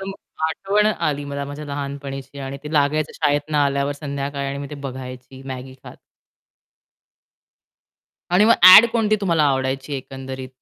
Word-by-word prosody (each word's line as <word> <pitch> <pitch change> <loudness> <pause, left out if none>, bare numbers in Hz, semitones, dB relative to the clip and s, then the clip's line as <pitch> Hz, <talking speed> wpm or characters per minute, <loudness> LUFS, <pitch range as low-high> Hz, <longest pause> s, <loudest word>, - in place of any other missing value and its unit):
एकदम 195 0 -5 0.4
आठवण 200 +5 0
आली 150 -9 -1
मला 140 0 -4
माझ्या 145 +2 -7
लहानपणीची 140 -1 -6
आणि 135 +1 -6
ते 150 - -7
लागायचं 150 0 +1
शाळेतून 145 0 -1
आल्यावर 140 -1 +1
संध्याकाळी 140 -1 -4
आणि 140 - -4
मी 140 - -5
ते - - -6
बघायची 130 -1 -9
मॅगी 130 0 -7
खात. - - -11 2.3
आणि 185 +4 +4
मग 230 - +6
ॲड 185 +5 +11
कोणती 215 -2 +2
तुम्हाला 170 -6 +2
आवडायची 135 0 -1
एकंदरीत? 130 0 -8
140 Hz, 140 wpm, -21 LUFS, 135-155 Hz, 2.3 s, ॲड